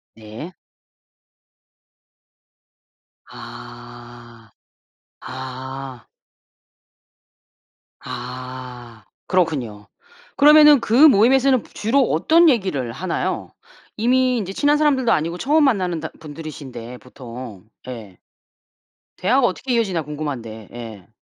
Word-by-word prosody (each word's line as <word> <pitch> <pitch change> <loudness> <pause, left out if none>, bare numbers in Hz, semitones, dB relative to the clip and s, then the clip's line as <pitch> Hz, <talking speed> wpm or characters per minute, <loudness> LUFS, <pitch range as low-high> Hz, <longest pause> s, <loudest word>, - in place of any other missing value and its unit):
네. 110 +11 -10 2.8
아. - - -12 0.7
아. 130 0 -8 1.9
아. 125 -2 -8 0.2
그렇군요. 130 - -1 0.5
그러면은 300 -1 +7
그 225 - -3
모임에서는 260 +2 +4
보 - - -19
주로 250 +6 +1
어떤 320 - +4
얘기를 185 - -1
하나요? 170 +7 -3 0.5
이미 255 +2 +2
인제 195 -3 -4
친한 290 +4 +2
사람들도 275 -6 +2
아니고 165 -1 0
처음 295 - +2
만나는 185 - +1
다 160 - -5
분들이신데 145 -6 -9
보통. 120 -5 -11 0.2
예. 110 -7 -9 1.0
대화가 240 +6 +3
어떻게 245 +7 -3
이어지나 195 -8 0
궁금한데 130 -8 -6
예. 110 -6 -10
155 Hz, 200 characters per minute, -21 LUFS, -, 2.8 s, 그러면은